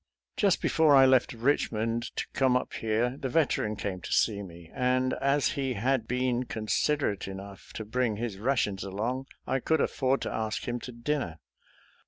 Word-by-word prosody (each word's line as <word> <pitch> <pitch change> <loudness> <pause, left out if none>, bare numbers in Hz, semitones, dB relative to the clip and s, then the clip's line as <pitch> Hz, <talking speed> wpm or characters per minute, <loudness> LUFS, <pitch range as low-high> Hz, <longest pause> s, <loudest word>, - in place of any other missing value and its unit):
Just 200 -4 +2
before 155 -3 +4
I 135 -1 +8
left 130 -1 +4
Richmond 115 -2 0
to - - -2
come 130 -2 +3
up - - -5
here 115 +4 0
the 130 - -3
Veteran 120 -7 +1
came 95 -3 -4
to - - -7
see 105 -3 +2
me, 85 -3 -11
and, 130 0 +1
as 140 +1 +3
he 135 -3 -1
had 120 +1 0
been 125 0 0
considerate 110 0 0
enough 95 0 -9
to 110 - -5
bring 115 0 0
his 110 -3 -4
rations 110 -5 0
along, 115 +7 -3 0.2
I 135 - 0
could 160 +4 +1
afford 135 -1 +1
to - - -3
ask 110 -1 -3
him 120 0 -2
to 125 - -8
dinner. 120 - -2
120 Hz, 175 wpm, -29 LUFS, 110-135 Hz, 0.2 s, I